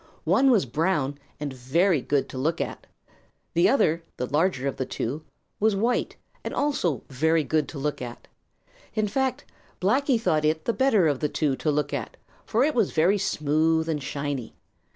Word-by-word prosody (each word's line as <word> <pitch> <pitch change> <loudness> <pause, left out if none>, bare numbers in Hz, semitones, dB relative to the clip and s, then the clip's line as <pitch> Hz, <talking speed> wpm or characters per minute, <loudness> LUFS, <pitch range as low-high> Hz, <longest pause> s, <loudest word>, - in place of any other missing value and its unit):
One 270 0 +4
was 225 - +4
brown 145 0 0 0.2
and 145 -2 -4
very 145 +6 +2
good 140 +1 0
to - - -7
look 160 +5 0
at. - - -4 0.7
The 170 - +4
other, 170 - +2 0.2
the 125 - -1
larger 145 -1 +1
of 135 - -3
the 130 - -1
two, 135 +7 -3 0.4
was 215 -1 +3
white 235 +5 0 0.3
and - - -4
also 185 - 0
very 160 +4 +2
good 155 -1 0
to 155 - -8
look 145 0 -2
at. 120 -1 -8 0.7
In 215 -1 +1
fact, 265 +5 -1 0.3
Blacky 255 +6 +2
thought 155 -9 +1
it 155 +1 +1
the 235 - +1
better 225 -10 +3
of 145 -3 0
the 150 - 0
two 145 -3 0
to 155 - -1
look 145 -1 0
at, 130 -5 -4 0.3
for 230 +4 +2
it 305 +2 +2
was 225 -7 +1
very 180 +6 +3
smooth 160 -1 +1
and 155 -3 -1
shiny. 140 -3 -4
160 Hz, 180 wpm, -26 LUFS, 145-200 Hz, 0.7 s, One